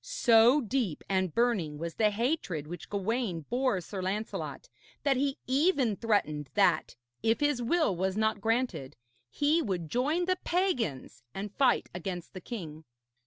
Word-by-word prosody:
So 245 - +5
deep 230 - -2
and 190 -2 0
burning 200 -9 +1
was 165 +1 -4
the 215 -1 +3
hatred 210 - -1
which 175 +3 -8
Gawaine 205 -3 -1
bore 245 - 0
Sir 190 +3 -6
Lancelot 210 - -4 0.4
that 280 -2 +3
he 275 +1 0
even 270 - +2
threatened 155 - 0
that, - - +2 0.3
if 225 +1 +2
his 290 -4 +1
will 305 - +2
was 190 +3 -1
not 220 -1 +1
granted, 225 - -1 0.3
he 300 - +2
would 180 - -3
join 300 +8 +1
the 370 0 +1
pagans 240 - -1
and 200 +1 -5
fight 260 0 +2
against 175 0 -5
the 185 - -8
king. 165 -9 -7
220 Hz, 150 wpm, -30 LUFS, 185-265 Hz, 0.4 s, So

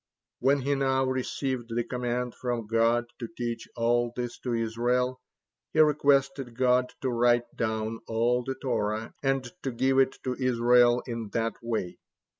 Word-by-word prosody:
When 135 +2 +3
he 140 +2 0
now 135 -1 +1
received 130 -2 -2
the 120 - +1
command 125 0 -2
from 120 -3 -3
God 115 +2 +2
to - - -4
teach 120 -1 -3
all 120 0 +1
this 120 -1 -4
to 125 - -3
Israel, 120 +3 0 0.5
he 155 - +1
requested 140 -4 +3
God 125 0 +3
to 130 - 0
write 120 0 +2
down 110 0 -2
all 120 +2 +1
the 135 +1 -3
Torah 110 -4 -2
and 135 -2 0
to 135 - -2
give 130 +3 +2
it 135 0 +2
to 130 - -1
Israel 120 -1 +3
in 115 -4 -5
that 115 -1 0
way. 110 -6 -3
120 Hz, 155 wpm, -28 LUFS, 115-130 Hz, 0.5 s, When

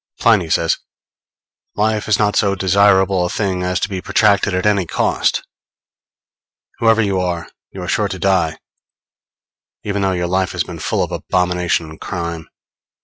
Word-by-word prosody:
Pliny 105 -8 +3
says: 80 0 +1 1.0
_Life 110 0 0
is 105 -2 +3
not 105 -1 +1
so 100 -1 +2
desirable 95 0 +3
a 90 - -1
thing 95 -3 -1
as 90 0 -1
to - - +1
be 95 -3 -5
protracted 105 +2 +2
at 95 +1 -1
any 100 -4 +2
cost. - - 0 1.4
Whoever 115 -1 +4
you 100 -2 0
are, 85 -2 -3 0.2
you 95 - -8
are - - -6
sure 105 0 +1
to 95 - -5
die, 90 -4 +1 1.3
even 100 -1 -2
though 95 -1 +1
your 90 -1 -1
life 95 +1 0
has - - 0
been - - -9
full - - 0
of - - -5
abomination 90 -2 0
and 80 - -13
crime. 85 -3 -5
95 Hz, 160 wpm, -18 LUFS, 90-100 Hz, 1.4 s, Whoever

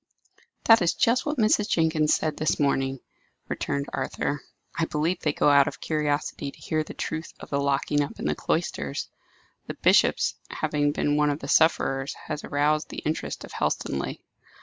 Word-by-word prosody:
"That 225 -1 +7
is 175 - +2
just 240 +5 +2
what 295 0 -1
Mrs. 215 -2 +3
Jenkins 160 -2 +3
said 155 -1 -1
this 155 - 0
morning," 135 -2 +1 0.5
returned 140 0 -2
Arthur. 135 +1 -2 0.3
"I 165 - +1
believe 160 +4 -1
they 150 - 0
go 145 - +2
out 140 -1 +6
of 145 - -5
curiosity 150 -2 -1
to - - -14
hear 155 -1 -1
the - - -10
truth 160 +1 -4
of - - -11
the 140 - +1
locking 140 +1 +1
up 145 - -4
in - - -5
the - - +2
cloisters. 70 -1 -2 0.6
The - - -5
bishop's - - +3 0.2
having 150 -2 0
been 145 0 0
one 150 0 +3
of 145 - 0
the - - -8
sufferers 135 -4 +2
has 155 -1 -4
aroused 150 +1 +1
the - - -7
interest 155 +1 -3
of - - -10
Helstonleigh." 70 0 -2
150 Hz, 175 wpm, -26 LUFS, 140-160 Hz, 0.6 s, That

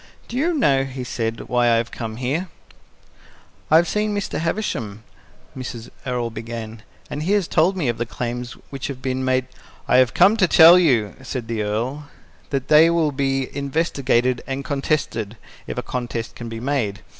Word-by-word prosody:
"Do 235 - -7
you 325 +6 +1
know," 140 - +3
he 135 -1 -6
said, 115 -2 -3
"why 120 -1 +1
I 115 - +4
have 115 +1 -1
come 110 -2 -5
here?" 135 +10 -2 1.2
"I 155 - +5
have 170 +2 +5
seen 210 0 0
Mr. 205 - -3
Havisham," 135 - -3 0.5
Mrs. 120 -3 -7 0.2
Errol 120 -2 -1
began, 115 0 -7 0.3
"and 145 - -3
he 180 +6 +1
has 200 -4 +2
told 180 +5 +2
me 155 -7 0
of 120 -1 -1
the 120 - -2
claims 120 0 -4 0.2
which 135 -2 -4
have 135 -2 -6
been 130 0 -1
made 130 0 +1 0.2
" - - -26
"I - - +4
have 130 0 +4
come 195 +5 +5
to 190 -5 +4
tell 170 +2 +8
you," 120 - +2
said 125 -2 -5
the 115 -2 -2
Earl, 120 +8 -2 0.4
"that 135 -2 -2
they 155 +2 +7
will 165 -3 +2
be 135 -1 -1
investigated 135 -4 0
and 135 0 -4
contested, 135 -6 -2 0.3
if - - -5
a - - -2
contest 120 -2 -4
can 120 -1 -7
be 115 0 -6
made. 120 -6 -1
130 Hz, 185 wpm, -22 LUFS, 120-155 Hz, 1.2 s, tell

